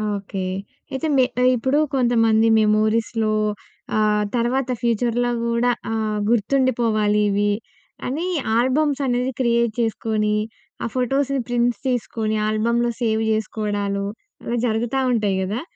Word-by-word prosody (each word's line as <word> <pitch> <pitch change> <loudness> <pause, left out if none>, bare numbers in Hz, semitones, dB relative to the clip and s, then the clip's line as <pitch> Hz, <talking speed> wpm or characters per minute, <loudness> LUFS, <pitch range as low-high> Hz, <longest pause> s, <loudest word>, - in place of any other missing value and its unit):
Okay. 195 -1 -4 0.5
అయితే, 270 +4 -2
మె 255 - +5 0.2
ఆహ్, 255 - +5
ఇప్పుడూ 260 +5 +1 0.2
కొంతమంది 225 -3 +3
మెమోరీస్‍లో 215 +1 +1 0.6
ఆహ్, 210 -1 +2
తర్వాత 245 +2 0
ఫ్యూచర్‍లో 240 +1 +1
గూడా 235 +1 +2 0.2
ఆహ్, 215 -1 -1
గుర్తుండిపోవాలివి 215 -4 +2 0.6
అనీ 295 +7 -2 0.3
ఆల్బమ్సనేది 260 -1 +1
క్రియేట్ 235 -2 +2
చేసుకోనీ, 215 -1 0 0.5
ఆ - - -1
ఫోటోస్‌ని 270 +2 0
ప్రింట్స్ 245 0 0
తీసుకోనీ 225 -3 -1
ఆల్బమ్‍‌లో 235 +3 +1
సేవ్ 220 -2 +1
చేసుకోడాలు, 205 -2 -2 0.4
అలా 240 - -2
జరుగుతా 240 +3 0
ఉంటాయి 210 -5 +1
గదా? 205 +7 -2
230 Hz, 105 wpm, -22 LUFS, 215-245 Hz, 0.6 s, మె